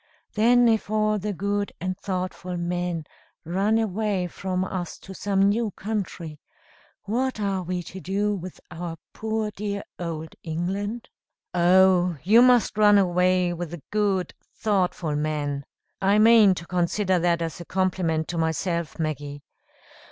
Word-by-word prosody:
Then 240 +3 +5
if 220 -3 +1
all 215 0 +1
the 210 +2 -2
good 200 +1 -2
and 185 +2 -2
thoughtful 185 -2 -4
men 175 -2 -2 0.4
run 195 +6 +1
away 210 -3 0
from 185 +1 -3
us 180 -2 -4
to 190 - -11
some 195 0 0
new 215 +3 +2
country, 185 -7 -5 0.6
what 250 +3 -1
are 195 -2 -1
we 180 0 -3
to 190 - -9
do 200 +3 0
with 185 -2 -7
our 170 -1 -5 0.2
poor 220 -1 -2
dear 200 0 -4 0.2
Old 160 -2 -5
England?" 195 +8 -3 0.4
"Oh, 180 -1 +4
you 215 +7 +6
must 245 -4 +4
run 205 -1 +7
away 180 -1 +2
with 175 -1 -5
the 170 -2 -9
good, 200 -4 0 0.2
thoughtful 180 -7 0
men 145 -2 -2 0.4
(I 195 +2 +4
mean 215 -3 +7
to 170 - -7
consider 180 +1 +1
that 170 0 +1
as 165 +1 -5
a - - -8
compliment 180 -4 0
to 170 - -2
myself, 165 +1 -1
Maggie!) 145 -2 -4
185 Hz, 145 wpm, -25 LUFS, 175-205 Hz, 0.6 s, run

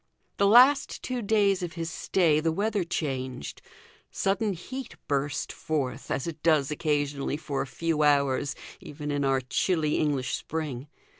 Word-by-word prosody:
The 200 - +4
last 255 +7 +5
two 255 -1 -2
days 200 -3 +2
of 175 -2 -4
his 165 0 -4
stay 165 -5 +2
the 165 +1 +1
weather 205 +3 0
changed. 130 - -4 0.5
Sudden 200 +1 0
heat 255 +10 -7
burst 140 0 -1
forth, 145 -5 -3
as 135 - -1
it 160 -2 -6
does 155 -4 +3
occasionally 145 -2 -1
for 145 -3 -3
a - - -3
few 165 +2 -1
hours 140 -1 +2 0.2
even 150 0 -6
in 145 0 0
our 135 -1 +2
chilly 155 +4 0
English 145 -4 0
spring. 150 -4 -4
155 Hz, 150 wpm, -27 LUFS, 140-185 Hz, 0.5 s, last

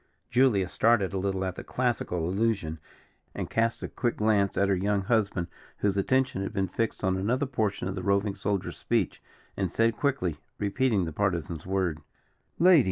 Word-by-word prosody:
Julia 120 -7 +4
started 110 -1 +2
a 95 - -1
little 95 0 -1
at 95 - -2
the - - -6
classical 110 -9 -1
allusion, 95 -5 0 0.6
and - - -4
cast 115 +1 +1
a - - -2
quick 120 -2 -2
glance 105 -2 +2
toward 100 0 +2
her - - +4
young 100 +1 0
husband, 100 -5 +1 0.3
whose 100 -1 +1
attention 130 +1 +1
had 100 - -4
been 95 -2 0
fixed 115 +4 -2
on 95 0 +2
another 120 +9 0
portion 110 -8 -1
of 95 - -2
the 95 - -4
roving 100 +2 +1
soldier's 100 -1 -2
speech, - - -1 0.3
and 95 -3 -1
said 115 0 +2
quickly, 105 - -1 0.2
repeating 105 -1 +1
the 80 - -5
Partisan's 85 -3 -2
word: 90 -5 0 0.6
"Lady! 175 0 +7
100 Hz, 175 wpm, -28 LUFS, 95-115 Hz, 0.6 s, Lady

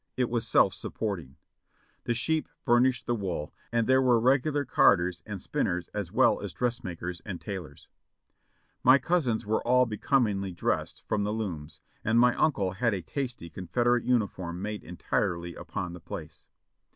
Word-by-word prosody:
It 125 -2 0
was 120 -2 -1
self - - +4
supporting. 90 -11 -4 0.7
The 120 - 0
sheep 155 +6 0 0.2
furnished 120 -1 +3
the 120 - 0
wool, 95 -9 -3 0.2
and 115 -1 +2
there 130 +2 +4
were 125 -3 +4
regular 135 +4 +2
carders 90 -7 +3
and 105 -2 -5
spinners 90 0 -2
as 100 -5 -4
well - - +3
as - - -5
dressmakers 90 -8 -3
and 95 -5 -5
tailors. 90 -8 -7 1.0
My 130 +2 +8
cousins 140 -10 0
were 110 +1 +1
all 125 +1 +4
becomingly 105 -4 0
dressed 85 - -2
from 105 -1 0
the 105 - -1
looms, 80 -8 -5 0.2
and 110 +2 +3
my 125 0 +5
uncle 100 -12 +1
had 110 +3 0
a 90 - -5
tasty 120 - -4
Confederate 120 +8 0
uniform 100 -8 -1
made 105 +2 -4
entirely 85 0 -2
upon 90 +2 -5
the 90 - -10
place. - - -8
105 Hz, 155 wpm, -28 LUFS, 90-125 Hz, 1.0 s, My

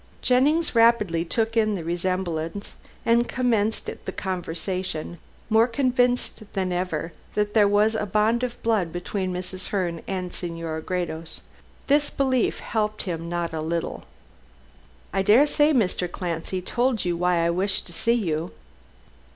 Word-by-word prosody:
Jennings 295 +6 +3
rapidly 230 -8 +4
took 225 +6 -1
in 215 -2 +3
the 175 - -4
resemblance, 175 +1 -2 0.3
and 235 +1 +3
commenced 225 -4 +1 0.2
the - - -3
conversation, 180 -2 -4 0.3
more 225 +1 +4
convinced 245 -3 0
than 190 -2 -1
ever 175 -2 -2 0.2
that 210 0 0
there 210 -2 +5
was 210 +2 +3
some 210 -2 -2
bond 215 +4 +2
of 250 -1 -3
blood 215 -7 +1
between 185 +2 -3
Mrs. 185 +1 -5
Herne 175 -4 -1
and 185 -2 -3
Senora 165 -2 -4
Gredos. 165 -2 -3 0.4
This 290 +1 +3
belief 260 -3 +1
helped 215 -1 -1
him 170 -2 -4
not 170 -1 -2
a 160 - -2
little. 165 +1 -3 1.1
"I 195 - +2
daresay 290 +9 +5
Mr. 185 - +1
Clancy 175 +1 -3
told 240 +2 0
you 175 -1 +1
why 175 -1 +2
I 170 - +3
wished 195 +3 -1
to 175 - -10
see 230 +8 +2
you?" 165 -7 -1
190 Hz, 145 wpm, -25 LUFS, 175-230 Hz, 1.1 s, there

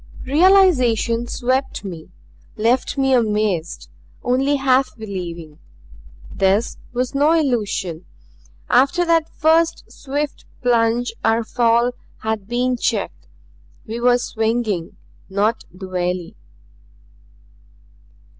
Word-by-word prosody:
Realization 265 - +3
swept 255 +1 -1
me; 170 -4 -8 0.5
left 235 +6 0
me 270 -1 +2
amazed; 210 -8 0 0.4
only 270 +3 +1
half 270 -2 +1
believing. 170 -7 -7 0.7
This 195 +4 +1
was 250 +1 -2
no 290 +3 +3
illusion. 210 - -1 0.6
After 280 +8 +3
that 330 -1 +2
first 325 +1 +2
swift 285 +1 -4 0.2
plunge 235 0 +2
our 225 +1 +2
fall 235 +1 +2 0.3
had 220 -3 -2
been 250 +2 0
checked. 205 - -2 0.6
We 225 +2 -5
were 245 0 +4
swinging 220 -6 -2 0.3
not 210 +4 0
the 185 +2 -9
valley. 180 -1 -3
235 Hz, 95 wpm, -20 LUFS, 205-265 Hz, 0.7 s, were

